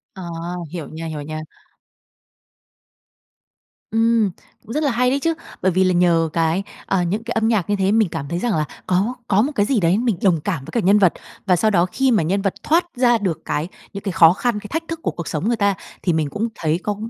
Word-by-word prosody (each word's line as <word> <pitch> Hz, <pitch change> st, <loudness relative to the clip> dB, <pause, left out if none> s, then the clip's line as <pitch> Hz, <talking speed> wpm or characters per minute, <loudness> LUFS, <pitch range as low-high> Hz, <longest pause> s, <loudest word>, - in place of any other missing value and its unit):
À, 190 Hz, -, -8 dB, 0.5 s
hiểu 165 Hz, -5 st, -5 dB
nha, 160 Hz, +1 st, -7 dB
hiểu 155 Hz, -2 st, -5 dB
nha. 155 Hz, +1 st, -5 dB, 2.5 s
Ừm, 225 Hz, -2 st, +3 dB, 0.3 s
cũng 230 Hz, +1 st, -8 dB
rất 305 Hz, -, 0 dB
là 285 Hz, -, +2 dB
hay 250 Hz, +1 st, +2 dB
đấy 275 Hz, +2 st, +1 dB
chứ. 330 Hz, +3 st, +1 dB, 0.3 s
Bởi 185 Hz, -, +3 dB
vì 185 Hz, +2 st, +3 dB
là 185 Hz, -1 st, +3 dB
nhờ 170 Hz, -2 st, +3 dB
cái, 165 Hz, +3 st, +1 dB, 0.2 s
ờ, 190 Hz, -, +1 dB
những 205 Hz, +6 st, -2 dB
cái 235 Hz, -, -6 dB
âm 225 Hz, 0 st, +1 dB
nhạc 210 Hz, -7 st, +1 dB
như 205 Hz, -, +2 dB
thế, 195 Hz, 0 st, +1 dB
mình 220 Hz, -3 st, +3 dB
cảm 160 Hz, -4 st, -5 dB
thấy 170 Hz, +4 st, -2 dB
rằng 240 Hz, +4 st, 0 dB
là 155 Hz, -1 st, +1 dB, 0.2 s
có 190 Hz, +7 st, +1 dB
có 200 Hz, +1 st, +3 dB
một 275 Hz, +6 st, 0 dB
cái 205 Hz, -, +3 dB
gì 245 Hz, 0 st, +1 dB
đấy 175 Hz, +2 st, +3 dB
mình 230 Hz, -5 st, 0 dB
đồng 180 Hz, -5 st, +3 dB
cảm 165 Hz, -6 st, -3 dB
với -, -, -9 dB
cả 240 Hz, -, 0 dB
nhân 205 Hz, +1 st, +4 dB
vật. 185 Hz, -4 st, +4 dB, 0.3 s
Và 185 Hz, -2 st, +4 dB
sau 215 Hz, +5 st, +2 dB
đó 175 Hz, -3 st, +4 dB
khi 265 Hz, +7 st, +1 dB
mà 210 Hz, -8 st, +3 dB
nhân 195 Hz, +5 st, 0 dB
vật 195 Hz, -1 st, 0 dB
thoát 340 Hz, +3 st, +3 dB
ra 245 Hz, -1 st, +4 dB
được 190 Hz, -7 st, -2 dB
cái 150 Hz, +3 st, -1 dB, 0.3 s
những 200 Hz, -, -6 dB
cái 195 Hz, -, -2 dB
khó 165 Hz, -1 st, +6 dB
khăn, 230 Hz, +2 st, -1 dB
cái 210 Hz, -, -9 dB
thách 325 Hz, +2 st, -2 dB
thức 330 Hz, -1 st, -4 dB
của -, -, -1 dB
cuộc 170 Hz, -, -7 dB
sống 160 Hz, +7 st, -2 dB
người 235 Hz, -, +1 dB
ta 200 Hz, -2 st, +2 dB, 0.3 s
thì 175 Hz, -, +2 dB
mình 155 Hz, -2 st, 0 dB
cũng 215 Hz, +9 st, -2 dB
thấy 160 Hz, +1 st, 0 dB
có 210 Hz, -, -1 dB
195 Hz, 245 wpm, -21 LUFS, 170-230 Hz, 2.5 s, khó